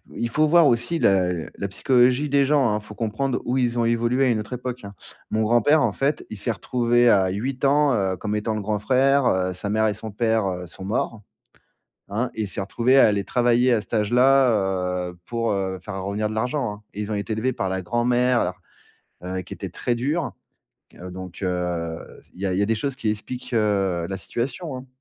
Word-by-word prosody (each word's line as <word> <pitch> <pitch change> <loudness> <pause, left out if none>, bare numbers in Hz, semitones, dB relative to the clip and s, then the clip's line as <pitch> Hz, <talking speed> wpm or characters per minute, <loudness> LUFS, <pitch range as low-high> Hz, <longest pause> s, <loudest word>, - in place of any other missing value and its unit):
il 120 - -2
faut 155 +5 +2
voir 170 +1 +6
aussi 120 +6 +1
la 95 - +3 0.3
la 100 - -3
psychologie 125 +7 +2
des 140 0 +3
gens, 140 -2 +3
hein. 105 - 0
Il - - -16
faut 105 -1 -11
comprendre 120 +4 -1
où 125 +2 0
ils 120 -1 0
ont 115 - +2
évolué, 120 +3 +2
à - - +3
une 110 - 0
autre 105 +4 -6
époque, 125 -1 -5
hein. 100 0 -10 0.3
Mon 110 0 0
grand-père, 120 +7 +4
en - - +2
fait, 140 +2 -1
il 110 - -5
s'est 115 - -1
retrouvé 120 +2 +2
à 95 -3 +4
8 125 +8 -4
ans, 140 0 +4
heu, 95 -4 0
comme 105 +3 -3
étant 110 +1 -1
le 105 - -2
grand 105 +1 -1
frère, 135 +3 +3
heu, 95 0 +1
sa 95 +3 -5
mère 110 +1 +2
et 105 - 0
son 110 +1 -7
père, 110 -1 +1
heu, 90 -1 -4
sont 90 +2 -10
morts, 110 +1 -2 0.9
hein. 110 +5 -2
Il 110 -2 -2
s'est 100 - -4
retrouvé 120 +7 +2
à - - +8
aller 100 -2 0
travailler 120 0 +3
à 110 - +2
cet 100 - -13
âge-là, 105 -6 +2
heu, 90 - -12
pour, 115 -1 -1
heu, 95 -2 -2
faire 95 0 -6
revenir 100 +3 -2
de 110 - -5
l'argent, 125 0 -1
hein. 105 0 -10
Ils 105 +1 -4
ont - - 0
été 100 +1 -3
élevés 115 +4 0
par 95 -6 -3
la 95 0 -2
grand-mère, 120 +4 +2
alors, 90 +2 -2 0.6
heu, 95 +1 -3
qui - - -12
était - - -5
très 120 -1 -2
dure. 145 +6 -1 0.8
Donc, 95 -1 -9
heu, 90 -2 -2 0.3
il - - -16
y 100 - -1
a 95 - 0
il 95 - 0
y - - +2
a - - +3
des 115 - +1
choses 135 +4 -3
qui 110 -5 -1
expliquent, 125 +4 -6
heu, 100 -6 +1
la 95 - -3
situation, 130 - -4
hein. 130 +1 -10
110 Hz, 225 wpm, -23 LUFS, 100-125 Hz, 0.9 s, à